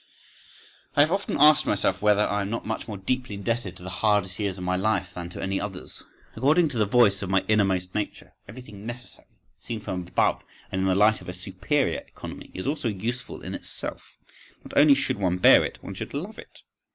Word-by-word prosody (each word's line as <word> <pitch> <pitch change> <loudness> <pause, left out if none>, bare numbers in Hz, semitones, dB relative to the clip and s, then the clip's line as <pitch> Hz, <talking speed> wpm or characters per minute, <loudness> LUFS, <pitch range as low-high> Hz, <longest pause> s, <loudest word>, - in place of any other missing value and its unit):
I 145 - +6
have 155 +3 +4
often 195 +1 -1
asked 150 +1 +6
myself 95 -2 +1
whether 105 0 +4
I 105 -1 0
am 100 - -3
not 115 - -3
much 110 - -4
more 105 -3 -5
deeply 125 +3 -2
indebted 100 -2 -3
to 90 - -13
the 95 - -6
hardest 105 -3 +2
years 100 -3 -1
of 90 - -6
my 90 0 0
life 95 -2 0
than 85 -1 -6
to - - -7
any 95 0 -1
others. 95 -3 -7 0.3
According 150 +7 +3
to 125 -5 -4
the 105 - +3
voice 105 -3 +4
of 95 - -4
my 95 0 +2
innermost 95 -4 +1
nature, 105 -1 -4
everything 105 -2 -11
necessary, 120 +1 -7 0.3
seen 115 -2 -5
from 95 -4 -5
above - - +1 0.3
and 95 - -1
in 95 - +1
the 95 - +3
light 105 +2 +4
of - - -9
a - - -4
superior 95 +10 -1
economy, - - -10
is 95 - -5
also 145 -2 -1
useful 115 +4 -4
in - - -5
itself—not - - -10
only 145 0 +7
should 135 -6 -1
one 90 -2 +1
bear 90 - +7
it, - - -4
one 100 - -6
should 95 - -6
love 190 +10 -5
it. - - -14
105 Hz, 210 wpm, -26 LUFS, 95-120 Hz, 0.3 s, only